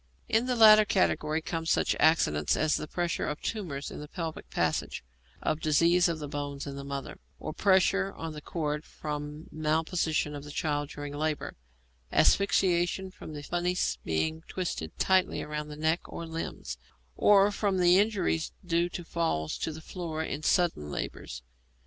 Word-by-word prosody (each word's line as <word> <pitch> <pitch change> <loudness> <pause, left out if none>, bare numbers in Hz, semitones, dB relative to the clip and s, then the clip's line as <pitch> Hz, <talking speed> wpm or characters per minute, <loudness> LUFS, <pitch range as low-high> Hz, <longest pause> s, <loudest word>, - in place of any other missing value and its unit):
In 225 +3 +2
the 250 - +1
latter 215 -2 +9
category 160 -6 +1
come 165 -1 -3
such - - +2
accidents 75 - +3
as 155 0 +2
the 155 - -3
pressure 175 +1 -1
of 150 - -3
tumours 165 -11 -4
in - - -7
the 150 - -7
pelvic 165 0 -6
passages, - - -1 0.4
or - - +3
disease 165 +3 +3
of 165 - -1
the 150 -2 -6
bones 145 -1 -4
in 140 -1 -6
the 140 - -6
mother, 140 0 -6 0.2
or - - -5
pressure 195 +2 +3
on 165 -1 -6
the 150 - -8
cord 150 -2 -3
from 150 0 -6
malposition 155 0 0
of 145 - -7
the 145 - -10
child 145 -1 -1
during 145 -1 -6
labour, 155 +1 -2 0.6
asphyxiation 190 -1 +3
from 155 - -10
the 145 -1 -7
funis 175 +3 0
being 160 - -1
twisted 125 - -4
tightly 190 -1 +2
round 150 0 -4
the 150 - -7
neck 160 +3 +1
or 170 - -7
limbs, 165 0 -5 0.4
or 205 0 +5
from 200 -2 0
injuries 180 -2 +3
due 170 0 +1
to 175 - -6
falls 160 - -1
on 160 - -3
the 160 - -9
floor 160 -2 -4
in 150 -1 -4
sudden 160 - +1
labours. 60 -3 -5
160 Hz, 165 wpm, -29 LUFS, 150-180 Hz, 0.6 s, latter